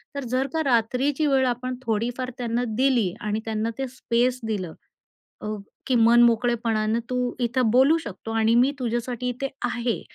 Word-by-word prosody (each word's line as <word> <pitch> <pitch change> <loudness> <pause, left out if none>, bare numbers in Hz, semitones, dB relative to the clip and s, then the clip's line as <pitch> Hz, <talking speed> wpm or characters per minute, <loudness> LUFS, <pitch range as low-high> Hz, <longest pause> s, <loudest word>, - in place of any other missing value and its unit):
तर 280 - -3
जर 260 +2 +1
का 320 - +1
रात्रीची 260 +4 +1
वेळ 270 -2 +3
आपण 255 +1 -2
थोडीफार 235 +3 -1
त्यांना 240 0 -1
दिली 245 -8 +2
आणि 210 +1 -1
त्यांना 220 0 -1
ते 270 -1 -2
स्पेस 245 0 0
दिलं 185 -7 -3 0.7
अ, - - -5 0.4
की 260 - +2
मन 235 +1 +6
मोकळेपणानं 230 -1 +1
तू 250 - -2 0.3
इथं 240 0 +1
बोलू 265 +7 +5
शकतो. 225 - -8
आणि 225 0 +2
मी 250 +3 +4
तुझ्यासाठी 245 0 -2
इथे 255 +3 -3 0.2
आहे. 240 -1 -2
240 Hz, 160 wpm, -24 LUFS, 225-255 Hz, 0.7 s, मन